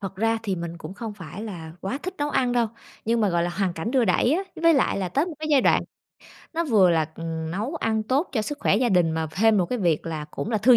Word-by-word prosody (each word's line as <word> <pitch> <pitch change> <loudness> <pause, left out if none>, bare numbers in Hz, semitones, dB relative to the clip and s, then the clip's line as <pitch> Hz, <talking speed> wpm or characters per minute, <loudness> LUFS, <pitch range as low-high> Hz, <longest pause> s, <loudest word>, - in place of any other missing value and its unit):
Thật 195 -1 -6
ra 225 +2 +1
thì 195 -4 -1
mình 170 0 -5
cũng 160 +4 -8
không 220 0 -6
phải 190 +1 -8
là 170 -7 -7
quá 195 +8 -3
thích 370 - -4
nấu 295 0 0
ăn 250 -3 +1
đâu, 240 -1 +2 0.4
nhưng 230 +1 +1
mà, 210 - +3
gọi 175 -1 +1
là, 175 - -1
hoàn 190 0 -1
cảnh 170 +7 -4
đưa 255 -2 +3
đẩy 220 +6 +3
á. 360 +5 +1 0.2
Với 335 -1 +6
lại 265 - +2
là 190 -2 -1
tới 280 - +1
một 345 - -6
cái 310 0 -4
giai 285 -3 +6
đoạn - - +4 0.7
nó 335 +1 0
vừa 210 - +5
là, 160 -2 +2
ừm, 160 -1 -4
nấu 215 - -3
ăn 220 -7 0
tốt 265 +9 0
cho 220 -5 0
sức 290 +6 -4
khỏe - - +3
gia 245 +2 +2
đình 180 -5 +3
mà 160 0 -1
thêm 215 +5 +3
một 180 - +2
cái 250 +4 -2
việc 170 -5 +1
là 155 -2 -3
cũng 215 - -4
là 220 - +1
thư 240 +4 +6
210 Hz, 285 wpm, -25 LUFS, 175-250 Hz, 0.7 s, Với